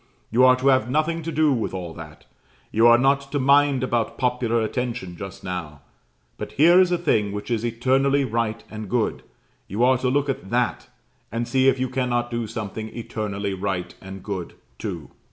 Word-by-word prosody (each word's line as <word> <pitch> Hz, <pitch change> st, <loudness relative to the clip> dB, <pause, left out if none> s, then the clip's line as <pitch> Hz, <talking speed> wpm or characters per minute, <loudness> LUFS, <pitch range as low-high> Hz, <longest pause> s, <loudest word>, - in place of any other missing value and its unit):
You 120 Hz, +3 st, +4 dB
are 130 Hz, 0 st, +7 dB
to 130 Hz, +2 st, +2 dB
have 130 Hz, -3 st, +3 dB
nothing 155 Hz, +4 st, 0 dB
to 165 Hz, +1 st, -4 dB
do 155 Hz, -1 st, +3 dB
with 115 Hz, -5 st, -2 dB
all 90 Hz, -3 st, -5 dB
that; 80 Hz, -2 st, -11 dB, 0.5 s
you 115 Hz, +2 st, +5 dB
are 120 Hz, 0 st, +7 dB
not 135 Hz, +2 st, +1 dB
to -, -, +1 dB
mind 140 Hz, -1 st, +4 dB
about 120 Hz, -3 st, -1 dB
popular 125 Hz, -2 st, +1 dB
attention 115 Hz, -6 st, -3 dB
just 95 Hz, +1 st, -8 dB
now; 85 Hz, -6 st, -5 dB, 0.6 s
but -, -, -6 dB
here 170 Hz, +5 st, +6 dB
is 180 Hz, -1 st, +2 dB
a 175 Hz, -, +2 dB
thing 110 Hz, -12 st, +1 dB
which 105 Hz, +4 st, -5 dB
is 115 Hz, -1 st, 0 dB
eternally 135 Hz, +4 st, +2 dB
right 115 Hz, -1 st, -2 dB
and 110 Hz, -2 st, -7 dB
good: 120 Hz, 0 st, 0 dB, 0.5 s
you 105 Hz, +6 st, -1 dB
are 130 Hz, 0 st, +4 dB
to 125 Hz, -, 0 dB
look 145 Hz, +2 st, +1 dB
at 130 Hz, -8 st, -4 dB
that, 120 Hz, +2 st, 0 dB, 0.4 s
and 115 Hz, +1 st, -2 dB
see 130 Hz, 0 st, +2 dB
if 135 Hz, -, +3 dB
you 130 Hz, -, 0 dB
cannot 125 Hz, -2 st, -1 dB
do 120 Hz, -1 st, -2 dB
something 110 Hz, 0 st, -5 dB
eternally 100 Hz, -3 st, -3 dB
right 95 Hz, -2 st, -3 dB
and 95 Hz, -1 st, -9 dB
good 95 Hz, -4 st, -5 dB, 0.2 s
too." -, -, -6 dB
120 Hz, 190 wpm, -23 LUFS, 105-135 Hz, 0.6 s, are